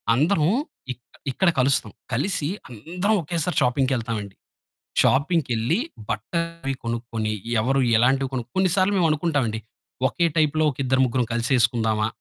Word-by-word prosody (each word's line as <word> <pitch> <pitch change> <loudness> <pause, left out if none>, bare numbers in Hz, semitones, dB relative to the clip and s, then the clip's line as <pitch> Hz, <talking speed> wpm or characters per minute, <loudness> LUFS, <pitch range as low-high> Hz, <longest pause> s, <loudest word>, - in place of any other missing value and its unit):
అందరం 155 +3 +2 0.5
ఇక 125 - -25 0.3
ఇక్కడ 190 +7 +2
కలుస్తాం. 130 -4 +2 0.2
కలిసి 145 +4 0 0.2
అందరం 180 - -1
ఒకేసారి 170 +2 -2
షాపింగ్‌కెళ్తాం 125 -3 +1
అండి. 100 -1 -10 0.7
షాపింగ్‌కెళ్లి 140 - +2 0.3
బట్టలయి 165 +3 -3
కొనుక్కొని, 115 -2 -2 0.3
ఎవరు 135 +4 +1 0.2
ఎలాంటివి 130 +3 +2
కొన్ 125 -2 -2
కొన్ని 185 -1 +2
సార్లు 195 +1 +2
మేము 175 -3 +3
అనుకుంటాం 155 -2 +1
అండి, 110 - -4 0.5
ఓకె 170 +5 +1
టైప్‌లో 155 0 +3
ఒక 130 - -14
ఇద్దరు, 130 +1 +2
ముగ్గురు 125 0 0
కలిసేసుకుందామా? 115 -3 +1
135 Hz, 130 wpm, -23 LUFS, 115-165 Hz, 0.7 s, మేము